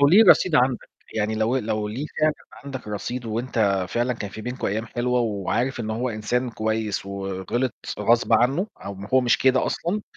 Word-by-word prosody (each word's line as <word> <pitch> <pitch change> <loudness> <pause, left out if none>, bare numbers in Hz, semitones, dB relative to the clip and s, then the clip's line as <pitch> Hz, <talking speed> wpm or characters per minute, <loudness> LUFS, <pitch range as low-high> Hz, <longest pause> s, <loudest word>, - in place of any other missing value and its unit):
لو 140 - +6
ليه 200 +8 +7
رصيد 180 - +6
عندك، 130 -3 +2 0.3
يعني 110 0 0
لو 110 +4 +1
لو 110 -3 -1
ليه 125 +8 -4
فعلًا 155 0 +3 0.3
عندك 130 -5 -7
رصيد 120 +4 -4
وأنت 110 -4 0
فعلًا 120 +1 0
كان 105 -4 -6
في 110 - -8
بينكم 125 +2 -3
أيام 110 +3 -2
حلوة 125 +2 0
وعارف 115 +4 -1
إن 110 -1 -3
هو 120 +4 -1
إنسان 120 +3 -1
كويس 110 -3 -2
وغلِط 100 +5 -2 0.3
غصب 115 +1 +3
عنه 135 - +3 0.2
أو 100 - -5
ما 100 +1 -9
هو 130 - +7
مش 120 -2 +3
كده 130 0 +3
أصلًا، 195 +5 -2
115 Hz, 190 wpm, -24 LUFS, 105-130 Hz, 0.3 s, ليه